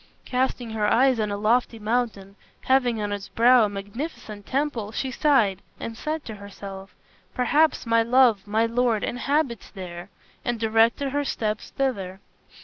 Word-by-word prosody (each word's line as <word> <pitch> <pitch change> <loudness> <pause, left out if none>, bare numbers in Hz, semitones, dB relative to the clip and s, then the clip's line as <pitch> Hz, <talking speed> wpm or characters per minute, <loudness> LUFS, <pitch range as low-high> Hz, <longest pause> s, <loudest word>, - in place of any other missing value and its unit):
Casting 250 -2 -1
her 215 -1 0
eyes 255 +1 +4
on 210 -1 0
a 205 - -2
lofty 230 +3 +1
mountain 215 -3 -2 0.3
having 250 -4 +2
on 205 -1 -2
its 200 -1 -5
brow 240 0 +5
a - - -2
magnificent 205 +1 -7
temple, 260 -7 -1
she 260 +3 -3
sighed 235 -9 +2 0.2
and 225 - -5
said 305 +5 -4
to 220 - -6
herself, 195 -1 -10 0.4
"Perhaps 295 +5 +2
my 230 0 +3
love, 230 -4 +3
my 220 +2 +2
lord, 230 -2 +1
inhabits 255 -2 -1
there," 180 -1 -8 0.3
and 240 -2 -2
directed 225 +5 +2
her 290 +1 0
steps 215 -5 -3
thither. 195 -9 -2
230 Hz, 150 wpm, -24 LUFS, 205-255 Hz, 0.4 s, brow